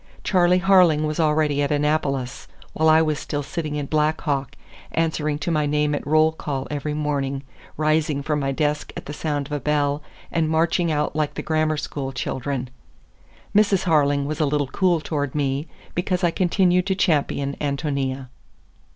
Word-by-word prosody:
Charley 180 -1 +3
Harling 180 -5 +5
was 155 +2 -2
already 150 -2 +2
at 145 - 0
Annapolis, 145 -4 -1 0.3
while 160 0 +3
I 160 +1 +6
was 155 -1 -1
still 145 -1 -3
sitting 150 +1 -4
in 145 -1 -2
Black 155 +2 +1
Hawk, 140 -3 -2 0.4
answering 155 -2 0
to 150 +3 -3
my 150 -2 +1
name 150 0 +1
at 145 - -3
roll 155 +1 +4
call 140 -4 -4
every 150 +1 -3
morning, 140 -2 -2 0.3
rising 155 -2 +1
from 150 0 0
my 135 -1 -1
desk 150 +1 -1
at - - -7
the 145 - -6
sound 145 -2 -2
of - - -15
a 145 - -1
bell 145 +1 0 0.3
and 160 -2 +1
marching 165 +1 +2
out 150 0 -1
like 155 -1 -1
the - - -4
grammar 155 -1 +1
school 140 -2 -4
children. 130 0 -3 0.8
Mrs. 205 -3 +4
Harling 145 -4 +2
was 155 +3 -3
a 155 - +3
little 145 0 +1
cool 175 -2 +2
toward 145 -3 -3
me, 140 +1 -1 0.3
because 180 +1 -1
I 175 - +3
continued 180 0 +2
to 190 - +1
champion 145 -6 +1
Ántonia. 140 -2 -2
150 Hz, 175 wpm, -23 LUFS, 145-160 Hz, 0.8 s, I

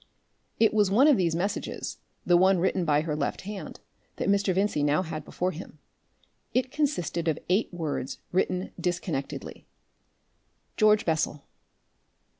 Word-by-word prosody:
It 225 -1 +4
was 210 -3 +3
one 245 +9 +5
of 295 - +6
these 170 -5 +1
messages, 190 +5 -3 0.3
the 175 - +4
one 190 +2 +5
written 180 0 +1
by 150 -1 +3
her 155 -1 -2
left 145 -2 -2
hand, 205 0 -7 0.4
that - - -2
Mr. 200 -1 +3
Vincey 190 -4 +1
now 150 +4 +2
had 155 -3 -5
before 180 +4 -2
him. 170 +3 -10 0.8
It 255 0 +1
consisted 180 - -1
of 160 - +1
eight 195 +5 +2
words 160 -6 -3
written 185 0 0
disconnectedly: 175 -6 -3 1.1
"George 215 -1 +4
Bessel... 155 -3 0
180 Hz, 140 wpm, -27 LUFS, 160-200 Hz, 1.1 s, of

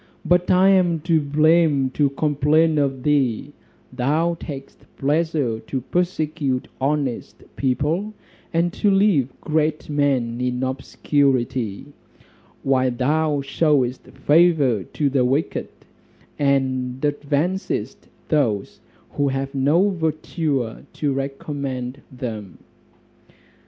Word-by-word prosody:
But 180 0 +2
I 185 +1 +5
am 180 -4 +3
to 165 -1 +2
blame 150 -2 +3
to 145 +1 +2
complain 150 +2 +2
of 135 -3 -1
thee; 140 -2 +1 0.4
thou 155 +7 +1
takest 135 -3 -9
pleasure 145 -5 0
to 130 - -4
persecute 155 -4 -1
honest 140 -3 -2
people, 155 +11 -1 0.4
and 170 +1 +1
to 205 - +1
leave 195 - +3
great 155 0 -1
men 130 -5 0
in 125 0 -1
obscurity, 130 -4 0 0.8
while 130 -1 +2
thou 145 +4 0
shewest 140 -3 +1
favour 145 - +3
to 145 - -1
the 130 -2 +2
wicked, 135 +5 0 0.7
and 130 -3 0
advancest 150 +6 -2 0.2
those 120 - 0 0.3
who 145 - 0
have 135 +1 -2
no 145 +8 +3
virtue 155 -7 -2 0.2
to 145 -3 -1
recommend 135 -1 -4
them." 110 -6 -6
145 Hz, 100 wpm, -22 LUFS, 130-160 Hz, 0.8 s, I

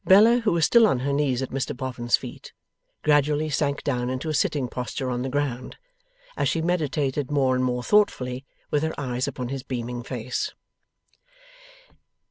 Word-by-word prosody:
Bella, 220 +6 +7
who 225 -3 +1
was 170 -2 +3
still 235 -2 +6
on 130 -11 +1
her 140 +2 0
knees 135 -3 +1
at 130 - -5
Mr 135 -2 -2
Boffin's 125 -3 0
feet, - - -10 0.5
gradually 150 +1 +2
sank 140 0 0
down 125 -3 -1
into 130 +5 -3
a - - -1
sitting 145 -3 +1
posture 125 +1 -4
on 120 0 -2
the 130 - -2
ground, 130 -3 -2 0.6
as - - +1
she 165 - 0
meditated 150 -5 0
more 135 -3 +2
and 130 0 +1
more 125 -1 0
thoughtfully, 130 -12 +2 0.3
with 145 - +2
her 160 0 -2
eyes 125 -2 -2
upon 125 -1 -4
his 135 0 -3
beaming 125 -2 -4
face. 125 0 -4
135 Hz, 170 wpm, -25 LUFS, 125-150 Hz, 0.6 s, Bella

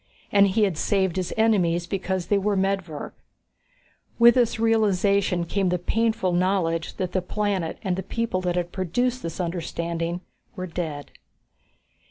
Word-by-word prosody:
And 200 0 +6
he 210 +3 +2
had 190 -6 0
saved 190 -4 +1
his 185 -2 -2
enemies 180 -6 +2
because 190 -1 -2
they 200 +3 +2
were 205 +1 0
medvirk. 190 -5 -2 1.0
With 235 0 +8
this 235 -2 +1
realization 200 -5 +2
came 190 +2 0
the 180 - +1
painful 220 +1 0
knowledge 175 -2 0
that 185 -2 -3
the 185 - 0
planet 195 -3 -2
and 185 -3 0
the 190 - -3
people 230 -1 -2
that 180 -1 -1
had 175 -1 -2
produced 245 +8 -1
this 165 -3 -6
understanding 170 0 -3 0.3
were 185 - -4
dead. 160 -5 -5
185 Hz, 150 wpm, -24 LUFS, 175-205 Hz, 1.0 s, With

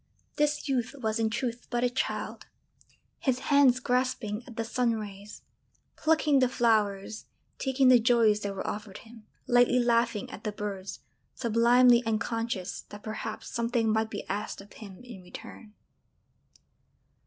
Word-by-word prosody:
_] - - -36
This 295 0 +1
youth 260 -1 -1
was 220 -3 -1
in 225 -1 +1
truth 235 +1 -3
but 240 0 -1
a 250 - +3
child, 255 - -3 0.7
his 260 -3 +1 0.2
hands 270 -3 +6
grasping 250 -4 -1
at 240 - -11
the 225 - -2
sun 235 +1 0
rays, 205 -1 -8 0.5
plucking 310 -3 +3
the 255 -1 +3
flowers, 215 -4 0 0.3
taking 265 -1 +3
the 250 -1 +7
joys 225 -2 +4
that 200 -1 -4
were - - -5
offered 205 -2 -5
him, 225 -1 -15 0.2
lightly 245 0 +4
laughing 235 -3 +1
at - - -9
the 210 - -2
birds, 200 -2 -6 0.3
sublimely 240 +1 +5
unconscious 225 -3 -2
that 205 0 -11
perhaps 215 0 -6
something 235 -1 0
might 220 0 0
be 205 - -6
asked 205 +2 -4
of 195 +1 -13
him 200 -1 -11
in 235 -6 -10
return. 195 +4 -11
230 Hz, 150 wpm, -28 LUFS, 210-245 Hz, 0.7 s, the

